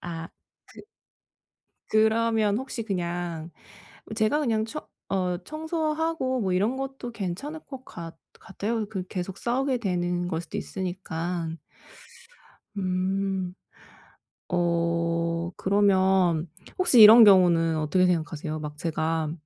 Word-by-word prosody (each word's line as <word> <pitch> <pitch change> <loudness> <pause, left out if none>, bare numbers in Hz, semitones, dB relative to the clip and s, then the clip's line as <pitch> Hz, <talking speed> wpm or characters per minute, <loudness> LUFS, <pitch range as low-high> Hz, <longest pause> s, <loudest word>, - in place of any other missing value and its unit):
아. 165 -1 -6 0.4
그 - - -14 1.1
그러면 220 -1 +2
혹시 260 -2 -5
그냥 175 -5 -3 0.5
뭐 - - -8
제가 220 +7 +2
그냥 225 -6 +1
청 300 +7 -7 0.2
어 180 -2 -1
청소하고 315 -4 -2
뭐 190 -3 0
이런 205 +7 +1
것도 270 -2 -5
괜찮을 225 - -5
것 265 -3 -11
같 165 -1 -9 0.2
같아요. 215 +3 -3
그 190 -4 -5
계속 185 +1 -5
싸우게 255 +2 0
되는 175 -4 -1
걸 165 -2 -2
수도 165 - -6
있으니깐. 175 -2 -4 1.2
음. 190 0 -1 0.9
어 170 -1 0
그러면 190 -4 +2 0.3
혹시 320 -10 +5
이런 220 +2 +11
경우는 175 -5 +5
어떻게 155 +4 +2
생각하세요? 160 -3 -2
막 150 -1 -7
제가 160 0 -1
185 Hz, 220 characters per minute, -26 LUFS, 170-225 Hz, 1.2 s, 이런